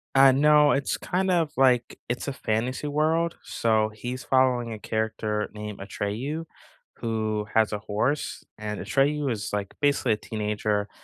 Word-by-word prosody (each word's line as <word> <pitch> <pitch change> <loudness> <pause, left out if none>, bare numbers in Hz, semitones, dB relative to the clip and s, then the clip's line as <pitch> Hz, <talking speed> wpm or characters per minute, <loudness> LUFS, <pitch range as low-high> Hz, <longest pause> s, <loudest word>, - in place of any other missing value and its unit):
Uh, 135 0 +8
no, 150 +1 +5
it's 135 0 0
kind 185 +1 0
of, 165 -4 +2
like, 125 -2 +3
it's 125 +3 -2
a 140 - -2
fantasy 125 +4 -2
world. 160 +3 +1
So, 110 -1 +1
he's 125 +4 -5
following 125 -3 +2
a 110 - -7
character 110 -1 -2
named 105 -1 -7
Atreyu, 115 +11 -3 0.5
who 110 -2 -2
has 110 -1 +3
a 105 - -2
horse. 110 +8 -1
And 105 -1 -4
Atreyu 145 0 +1
is, 105 -2 -3
like, 100 -1 -2
basically 140 -5 +3
a 105 - -2
teenager, 105 -1 -2
120 Hz, 150 wpm, -26 LUFS, 105-140 Hz, 0.5 s, Uh